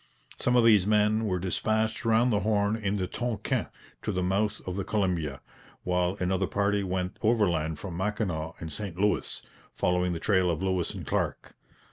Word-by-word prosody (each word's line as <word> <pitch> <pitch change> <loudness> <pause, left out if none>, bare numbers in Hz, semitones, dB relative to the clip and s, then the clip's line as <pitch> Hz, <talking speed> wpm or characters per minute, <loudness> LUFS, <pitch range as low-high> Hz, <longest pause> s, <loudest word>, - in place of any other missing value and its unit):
Some 125 - +2
of 120 - +6
these 105 -4 +6
men 105 +1 +3
were 95 -3 0
dispatched 110 +5 -1
round 115 +2 +4
the 105 - +3
Horn 105 0 +1
in 105 -2 -1
the 95 - -1
Tonquin 115 +2 -2 0.3
to - - -2
the 90 -2 -1
mouth 100 +3 0
of 90 - -4
the 100 - -2
Columbia; 90 -9 -1 0.4
while 90 +1 0
another 95 +1 +1
party 100 0 +1
went 90 -1 -3
overland 90 -9 +2
from 85 0 -6
Mackinaw 95 -5 -2
and 80 -1 -6
St 95 0 -6
Louis, 105 +1 0 0.3
following 90 0 +1
the 85 - -3
trail 95 -1 +2
of 85 +2 -1
Lewis 95 -3 0
and - - -6
Clark. - - -2
95 Hz, 175 wpm, -28 LUFS, 90-105 Hz, 0.4 s, of